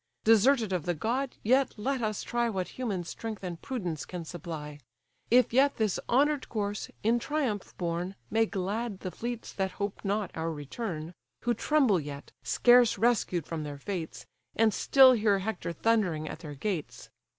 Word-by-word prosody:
Deserted 225 -1 +4
of 175 -3 -2
the 175 - +1
god, 245 - -1
yet 260 +4 +3
let 260 +4 -1
us 215 -2 -2
try 240 0 0
What 190 -4 -2
human 210 -8 -3
strength 215 +4 -6
and 175 -2 -5
prudence 180 - -3
can 175 -2 -6
supply; 155 -3 -7 0.5
If 245 -1 +4
yet 275 +3 +4
this 215 -4 0
honour'd 285 +3 +2
corse, 205 -2 -3
in 230 +3 +3
triumph 250 -7 -2
borne, 175 +2 -2 0.2
May 225 0 +3
glad 200 +1 -3
the 185 - -4
fleets 235 +2 -5
that 190 -1 -2
hope 200 -1 -4
not 205 0 -1
our 165 0 -2
return, 160 - -5 0.3
Who 240 - +2
tremble 240 - +3
yet, 145 -1 -8
scarce 245 -1 +5
rescued 215 - +1
from 165 -2 -4
their 145 -1 -6
fates, 170 +1 -5 0.3
And 220 -1 +3
still 265 +7 +7
hear 215 -4 +3
Hector 195 -3 -3
thundering 175 -5 +1
at - - -6
their 150 -3 -8
gates. 170 +1 -4
205 Hz, 165 wpm, -29 LUFS, 175-235 Hz, 0.5 s, still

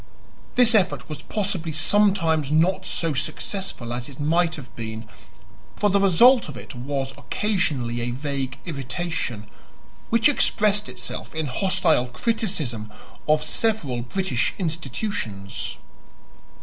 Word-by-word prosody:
This 245 -1 +6
effort 200 -5 +2
was 150 -1 -6
possibly 190 -4 -2
sometimes 160 -3 +3
not 165 +5 +2
so 165 -2 0
successful 155 - -3
as 120 +2 -4
it 140 - -12
might 165 +3 +2
have 125 -7 -11
been, 110 -1 -6 0.7
for 205 -1 +2
the 200 - +4
result 210 +5 +6
of 135 - -7
it - - -9
was 135 +2 -3
occasionally 140 - -1
a 120 - -2
vague 135 0 -3
irritation, 140 - -3 0.6
which 230 +2 +5
expressed 210 -7 +2
itself - - -6
in 160 -1 -1
hostile 160 -2 +2
criticism 150 - -2 0.4
of 155 0 +3
several 155 - -1
British 130 +1 -1
institutions. 155 - -3
155 Hz, 120 wpm, -24 LUFS, 125-195 Hz, 0.7 s, This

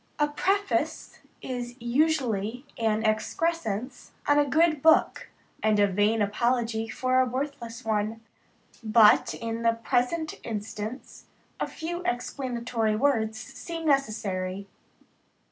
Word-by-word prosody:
A 295 - +3
preface 390 +6 -1 0.2
is 245 -1 -5
usually 245 -3 0
an 220 -1 0
excrescence 245 - -2
on 290 0 +5
a 290 -1 +2
good 315 0 +3
book, 320 +1 +3 0.3
and 215 -1 +2
a 205 - +6
vain 205 +3 +2
apology 225 +1 0
for 255 +3 +1
a 260 - +4
worthless 255 -2 -5
one; 220 0 -1 0.6
but, 220 -1 +5
in 230 0 -4
the 230 0 +3
present 250 +7 -1
instance, 215 +2 -6 0.3
a - - -1
few 345 +2 -5
explanatory 240 -4 -1
words 220 -3 +1
seem 325 +7 -7
necessary. 200 -9 -1
235 Hz, 110 wpm, -27 LUFS, 220-280 Hz, 0.6 s, a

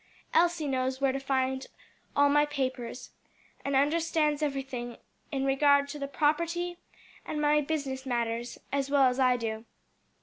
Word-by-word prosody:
Elsie 340 -2 +3
knows 260 -1 -1
where 275 -1 +2
to 270 - -3
find 265 -1 -1 0.5
all 285 0 +5
my 295 +1 +4
papers, 260 -4 -3 0.5
and 280 0 -1
understands 300 +1 +2
everything 270 -4 -3 0.3
in 270 -2 -1
regard 280 +1 +4
to 295 +1 -6
the 280 - -3
property 335 +5 0 0.4
and 300 - -4
my 300 0 +3
business 280 -3 -3
matters 235 -2 -2
as 275 -1 -1
well 280 -1 +4
as 255 0 +3
I 255 -1 +4
do. 220 -1 -4
275 Hz, 145 wpm, -29 LUFS, 260-295 Hz, 0.5 s, all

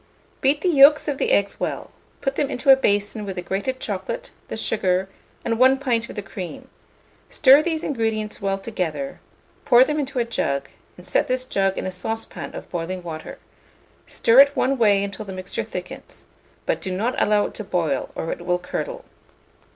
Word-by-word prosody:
Beat 285 +3 +2
the 370 - 0
yolks 295 -1 +6
of 285 -2 -2
the - - +1
eggs 200 0 +1
well; - - -3 0.3
put 270 - 0
them 275 0 -1
into 275 +1 +3
a - - +10
basin 205 -3 0
with 195 -2 -5
the 180 - -4
grated 200 +9 -2
chocolate, 215 - -4 0.2
the - - -5
sugar, 190 -4 0 0.4
and 230 0 0
1 260 +1 +6
pint 240 -4 -1
of - - -8
the 205 - -4
cream; 190 -2 -8 0.6
stir 275 +1 +6
these 320 -1 -2
ingredients 220 -5 -2
well 195 0 0
together, 165 -9 -4 0.4
pour 245 -1 +7
them 300 +3 -1
into 275 -2 -3
a 240 - +2
jug, 140 -12 -2 0.3
and 180 - -13
set - - +1
this 255 0 0
jug 195 -5 0
in - - -3
a 185 - -2
saucepan 225 +5 -5
of - - -8
boiling 180 +1 -4
water; 160 -2 -7 0.7
stir 230 +3 +4
it 280 +1 +7
one 270 0 +2
way 205 -3 +4
until 200 +2 -5
the 195 - -8
mixture 185 0 -4
thickens, - - -8 0.4
but - - -1
do 190 - -3
not 235 +6 0
allow 210 0 +3
it - - -6
to 215 - -6
boil, 165 -8 -1
or 165 - -3
it - - -5
will 180 0 +1
curdle. - - -5
215 Hz, 190 wpm, -23 LUFS, 185-265 Hz, 0.7 s, a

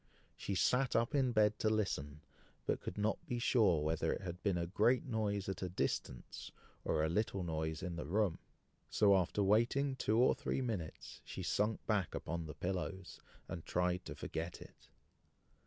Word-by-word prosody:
She 100 - -3
sat 125 +7 +2
up 115 +5 +2
in 135 -3 +3
bed 105 -2 +3
to 110 - +2
listen, 75 -9 -1 0.4
but - - 0
could - - -6
not 105 +1 0
be 120 - -1
sure 105 - +3
whether 80 +1 +1
it - - -2
had 90 0 -6
been 100 -4 +1
a 85 - 0
great 110 +8 +2
noise 105 -5 -1
at 95 -2 -3
a 95 - -2
distance, 65 -7 -3 0.3
or 75 - +1
a - - +3
little 100 +3 0
noise 80 -1 -2
in 90 -2 -3
the 85 - -4
room; 100 -1 +1 0.5
so 100 -2 +5
after 95 +2 +1
waiting 120 +7 +3
two 110 -4 +1
or 125 +2 +5
three - - -2
minutes, 110 -11 -4
she - - -6
sunk 105 +1 0
back 105 -6 0
upon 85 0 -3
the 75 - -7
pillows, 95 0 -4 0.3
and 85 - -5
tried 90 0 0
to - - -6
forget 85 +2 -4
it. - - -15
95 Hz, 180 wpm, -36 LUFS, 85-110 Hz, 0.5 s, so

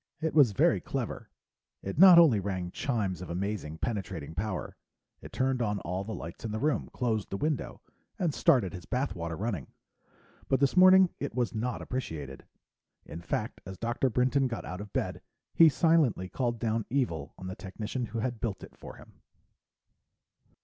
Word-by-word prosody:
It 160 0 -1
was 140 -9 +5
very - - +3
clever; - - -4 0.5
it 100 +9 -4
not 185 -2 +10
only 155 -11 +7
rang 90 -2 -3
chimes 100 - -2
of 90 - -7
amazing 90 -3 -3
penetrating 95 -6 -4
power, 95 +2 -4 0.5
it - - -11
turned 130 -1 0
on 105 -3 0
all 90 +2 -3
the 110 +1 -5
lights 85 - -8
in 115 - -3
the 110 - -2
room, 150 +3 0
closed 110 -4 -1
the 100 - -3
window, 150 +3 -3 0.3
and 170 -6 0
started 105 - +3
his 90 -1 -8
bath 130 -2 -1
water 85 -3 -5
running. 100 - -3 0.8
But 135 - +2
this 140 +3 +2
morning 185 0 +7
it 140 -5 -4
was 120 -2 0
not 120 +2 -3
appreciated. 75 - -5 0.6
In 85 - -8
fact, 85 - -3
as 95 0 -8
Dr. 120 +3 0
Brinton 130 +3 +2
got 120 - -5
out 90 +2 -6
of 105 -1 -9
bed, - - -2 0.3
he 165 -1 +7
silently 155 - +2
called 120 0 -1
down 115 -1 -1
evil 125 - -2
on 95 - -9
the 95 0 -5
technician 110 +5 -5
who 110 +2 -6
had 120 -1 -3
built 105 -4 -3
it - - -12
for - - -11
him. - - -17
110 Hz, 175 wpm, -29 LUFS, 95-130 Hz, 0.8 s, not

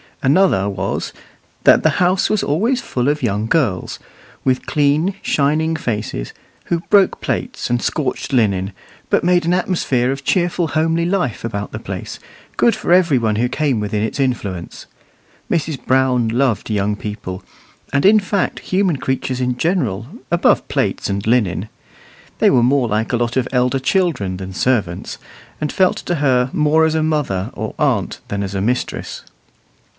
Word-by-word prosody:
Another 140 - +3
was, 95 0 -3 0.5
that - - +6
the - - +4
house 180 +1 +2
was 215 - +1
always 225 - +1
full 125 0 -2
of 150 -1 0
young 105 -2 0
girls, 115 - 0 0.5
with 130 -1 0
clean, 150 +6 +2
shining 155 +3 +1
faces, 105 - -3 0.3
who 170 - 0
broke 200 -2 +4
plates - - -3
and 120 -1 +1
scorched 135 -2 -2
linen, 100 -5 +1 0.4
but - - +3
made 175 -1 +3
an 170 - +2
atmosphere 140 -9 +1
of 135 0 -5
cheerful, 175 0 +1
homely 165 +2 +1
life 175 - -1
about 105 -2 -4
the - - -5
place, - - -6 0.4
good 235 - +4
for - - -3
every 175 -6 +5
one 110 -2 0
who 120 +2 +1
came 140 -4 0
within 105 0 -2
its 110 - -3
influence. 100 -10 -3 0.7
Mrs. 155 -4 -1
Brown 130 -2 +2
loved 120 -1 0
young 105 -1 0
people, 105 -3 -6 0.5
and 140 +3 +2
in 215 +2 +7
fact 200 0 -1
human 185 -5 0
creatures 130 -1 -2
in 125 -1 -1
general, 125 - -1 0.2
above 170 0 +3
plates - - -1
and 100 +1 -2
linen. 105 -4 +1 0.7
They - - +5
were 120 - +4
more 130 0 +3
like 110 +1 -1
a - - +3
lot 120 +1 -1
of 125 -1 +1
elder 125 +1 +1
children 130 - 0
than 95 0 -7
servants, 100 -6 -1 0.4
and 150 -1 -2
felt 185 -1 +2
to 175 - -2
her 130 -4 +2
more 155 +1 +3
as 160 0 0
a 160 - +1
mother 145 -12 -1
or - - -5
aunt - - 0
than 100 0 -2
as 100 -1 -4
a 95 - -1
mistress. 125 +5 -2
130 Hz, 165 wpm, -18 LUFS, 110-160 Hz, 0.7 s, in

